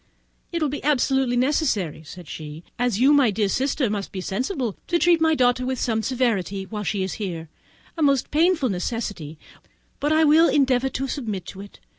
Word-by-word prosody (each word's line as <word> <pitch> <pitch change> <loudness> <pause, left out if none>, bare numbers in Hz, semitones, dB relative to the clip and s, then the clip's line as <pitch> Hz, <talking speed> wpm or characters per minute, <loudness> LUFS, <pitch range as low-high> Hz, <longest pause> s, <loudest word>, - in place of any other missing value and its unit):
"It 335 -2 -1
will 300 - +1
be 290 - -5
absolutely 265 -3 +1
necessary," 250 - 0
said 175 +2 -11
she, 155 +1 -8 0.2
"as 245 -4 0
you, 270 +4 +5
my 280 -5 +5
dear 210 0 0
sister, 265 +5 0
must 205 -2 -3
be 190 - -5
sensible, 240 - -3
to 345 - +2
treat 340 -1 +3
my 320 -1 +3
daughter 250 -1 +2
with 255 -1 -2
some 225 -2 0
severity 215 -5 -1
while 210 +1 -5
she 200 -1 -1
is 190 - -3
here; 165 -5 -5 0.5
a 330 - -5
most 280 -4 +2
painful 320 -3 +2
necessity, 185 -5 -4 0.6
but 295 - 0
I 315 +1 +4
will 315 +2 +5
endeavour 265 -2 +2
to 270 +1 -3
submit 215 - -4
to 195 - -9
it. 200 - -13
245 Hz, 190 wpm, -23 LUFS, 195-285 Hz, 0.6 s, you